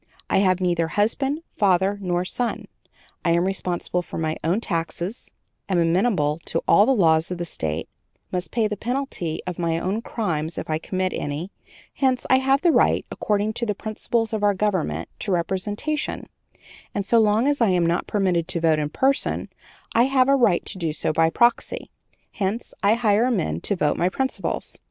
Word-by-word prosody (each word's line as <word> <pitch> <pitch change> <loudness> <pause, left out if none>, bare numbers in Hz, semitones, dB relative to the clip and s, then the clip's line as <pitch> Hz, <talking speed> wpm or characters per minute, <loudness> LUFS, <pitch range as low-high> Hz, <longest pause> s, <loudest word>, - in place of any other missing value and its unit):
I - - +4
have 185 -2 +3
neither 175 -3 +1
husband, 270 - 0
father, 195 0 +2
nor 180 -1 -1
son; 240 +5 -3 0.6
I 170 - +3
am 170 +1 +2
responsible 180 -2 -1
for - - -8
my 155 -1 -1
own 170 +6 +1
taxes; 175 +2 -3 0.4
am 185 - +1
amenable 165 -3 +2
to 165 - -2
all 205 - +6
the - - +4
laws 160 -5 +3
of 180 - -4
the 175 - -3
State; 80 - -3 0.4
must 180 -3 -2
pay 225 -3 +1
the 210 - -3
penalty 230 - -3
of 180 -1 -5
my 165 -1 0
own 190 +6 -2
crimes 170 -9 -3
if - - -4
I 155 - 0
commit 185 +2 -2
any; 150 +7 -4 0.4
hence 260 -2 +1
I 260 - +6
have 270 +1 +2
the 345 - +4
right, - - +3
according 210 +1 0
to 235 - -2
the 210 - -1
principles 225 +2 -2
of 215 - -1
our 205 -1 +3
government, 190 -4 -1
to 205 - -2
representation, 205 - -1 0.7
and 200 - -1
so 230 +3 +4
long 220 +3 +3
as 290 -2 +1
I 230 - +5
am 180 -2 +2
not 170 +2 0
permitted 185 -5 +1
to 170 - -1
vote 160 -2 +3
in 150 -1 -1
person, 265 - 0 0.4
I 235 +2 +5
have 265 -1 +3
a 275 - +5
right 215 -10 +3
to 185 - -2
do 165 -3 -1
so 155 - -1
by 160 +1 +3
proxy; 235 +8 +1 0.4
hence 205 +3 -3
I 205 +3 +4
hire 230 +1 +2
men 85 - -1
to - - -1
vote 150 -5 +1
my 175 - +2
principles.'" 265 +7 -3
190 Hz, 190 wpm, -23 LUFS, 170-225 Hz, 0.7 s, all